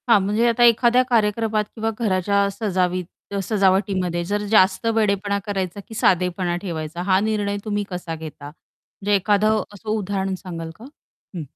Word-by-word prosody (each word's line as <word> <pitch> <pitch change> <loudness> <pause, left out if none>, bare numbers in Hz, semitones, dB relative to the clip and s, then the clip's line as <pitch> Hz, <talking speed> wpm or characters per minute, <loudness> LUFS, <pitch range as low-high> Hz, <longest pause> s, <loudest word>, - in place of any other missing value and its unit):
हां, 230 -3 +7
म्हणजे 210 +5 +1
आता 235 +1 +3
एखाद्या 240 +1 +5
कार्यक्रमात 220 -1 +1
किंवा 225 -1 -1
घराच्या 200 -2 +1
सजावी 185 -4 -1 0.3
अ, 200 - -1
सजावटीमध्ये 190 -3 +1
जर 205 +3 -1
जास्त 190 0 +4
वेडेपणा 200 -2 +1
करायचा, 195 -2 -3
की - - -11
साधेपणा 180 -2 +1
ठेवायचा 165 -2 -5
हा 185 0 +5
निर्णय 205 -1 -1
तुम्ही 205 -1 -1
कसा 180 -3 -5
घेता? 155 -2 -9
म्हणजे 200 +6 -5
एखादं 210 +2 +2
असं 210 +2 -9
उदाहरण 195 -2 -1
सांगाल 165 -3 -6
का? 230 - -11 0.5
हं. 170 - -3
200 Hz, 150 wpm, -22 LUFS, 185-215 Hz, 0.5 s, हां